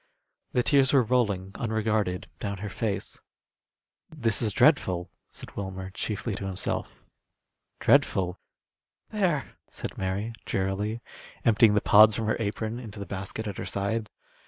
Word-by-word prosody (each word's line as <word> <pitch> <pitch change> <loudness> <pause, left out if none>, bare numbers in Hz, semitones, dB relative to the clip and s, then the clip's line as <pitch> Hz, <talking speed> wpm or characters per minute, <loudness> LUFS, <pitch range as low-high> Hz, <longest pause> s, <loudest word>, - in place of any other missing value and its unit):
The 125 - +3
tears 135 -1 +4
were 135 -3 +6
rolling 105 -6 +1
unregarded 110 -4 0
down 100 -1 -3
her 100 +1 -5
face. 105 -3 -3 0.9
"This 125 -10 0
is 110 -3 +2
dreadful," 95 - +3 0.2
said - - -10
Wilmer, 95 -1 -5
chiefly 105 +2 -3
to 95 0 -4
himself. 95 -1 -3 0.8
"Dreadful." 90 0 +3 0.7
"There!" 185 -9 0 0.2
said - - -7
Mary, 100 +4 -2
drearily, 100 +4 -2 0.4
emptying 110 -1 +5
the 105 - +3
pods 105 0 +7
from 115 - -2
her 110 - +1
apron 110 +2 -2
into 110 -4 -9
the 100 - -5
basket 100 +3 -5
at 100 -3 -5
her - - -4
side. 105 +2 -2
105 Hz, 135 wpm, -27 LUFS, 95-115 Hz, 0.9 s, pods